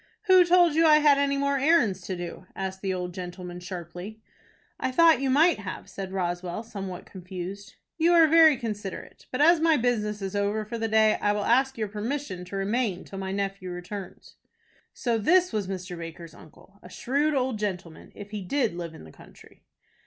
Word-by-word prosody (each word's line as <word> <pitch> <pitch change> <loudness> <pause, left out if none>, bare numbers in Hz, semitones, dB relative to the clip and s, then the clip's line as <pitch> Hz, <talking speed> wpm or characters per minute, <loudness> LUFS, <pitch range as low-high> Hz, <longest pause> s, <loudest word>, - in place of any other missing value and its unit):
"Who 375 -3 +6
told 350 -2 +5
you 325 +2 +3
I 305 - +7
had 295 -2 +4
any 280 0 +1
more 280 0 0
errands 260 - +3
to 185 - -3
do?" 175 +1 -7
asked 190 0 -5
the 195 - -1
old 180 -1 -4
gentleman, 180 -1 -7
sharply. 180 +3 -8 0.6
"I 260 - -1
thought 320 -1 +5
you 270 - 0
might 310 +2 +4
have," 200 -2 -7
said 190 -1 -7
Roswell, 175 +1 -3
somewhat 195 -5 -7
confused. 185 +2 -8 0.2
"You 335 +2 +4
are 335 -1 +7
very 320 -2 +6
considerate; 210 -4 -7
but, 255 - -1
as 335 +2 +6
my 320 -1 +3
business 215 -4 -1
is 195 +1 -4
over 205 +1 -1
for 230 +2 -6
the 225 - -1
day, 220 0 +3
I 205 - +2
will 205 0 -2
ask 265 +2 +2
your 215 -1 -2
permission 215 -1 -4
to 185 - -8
remain 200 -1 -1
till 195 - -9
my 190 0 -4
nephew 195 -1 -3
returns." 180 +2 -8 0.5
So 235 -3 -1
this 360 - +3
was 210 -3 -1
Mr. 185 -1 -5
Baker's 165 -1 -9
uncle, 190 +4 -18
a 180 - -13
shrewd 285 +9 0
old 255 -4 -1
gentlemen, 180 -6 -5
if 205 0 -10
he 210 -1 -4
did 235 +4 0
live 170 -2 -6
in - - -12
the 80 - -13
country. - - -18
205 Hz, 195 wpm, -26 LUFS, 185-270 Hz, 0.6 s, I